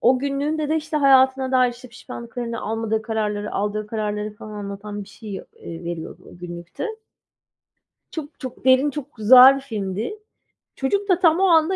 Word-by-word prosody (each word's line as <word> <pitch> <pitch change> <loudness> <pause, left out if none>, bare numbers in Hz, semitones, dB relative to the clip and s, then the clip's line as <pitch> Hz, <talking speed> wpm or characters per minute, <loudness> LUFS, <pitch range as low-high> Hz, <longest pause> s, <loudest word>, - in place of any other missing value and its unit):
O 255 +2 +4
günlüğünde 285 +3 -1
de 315 - +2
işte, 310 0 -3
hayatına 265 -1 +4
dair, 255 -1 +4
işte, 245 +1 -13
pişmanlıklarını, 235 0 -7
almadığı 220 0 -1
kararları, 210 -2 -2
aldığı 210 +1 -2
kararları 210 -1 -3
falan 215 0 -10
anlatan 205 0 -6
bir 195 - -18
şey, 200 0 -8
ııı, - - -13 0.4
veriyordu 170 -1 -6
o - - -14
günlükte 175 - -6 1.2
çok, 300 -3 -7
çok 255 -1 -8
derin, 260 +2 +5
çok 285 0 -7
güzel 255 +5 +8
filmdi. 220 - -4 0.6
Çocuk 400 +10 -1
da 365 -2 +4
tam 335 -1 +4
o - - +3
anda, 335 +1 +4
245 Hz, 160 wpm, -22 LUFS, 210-280 Hz, 1.2 s, güzel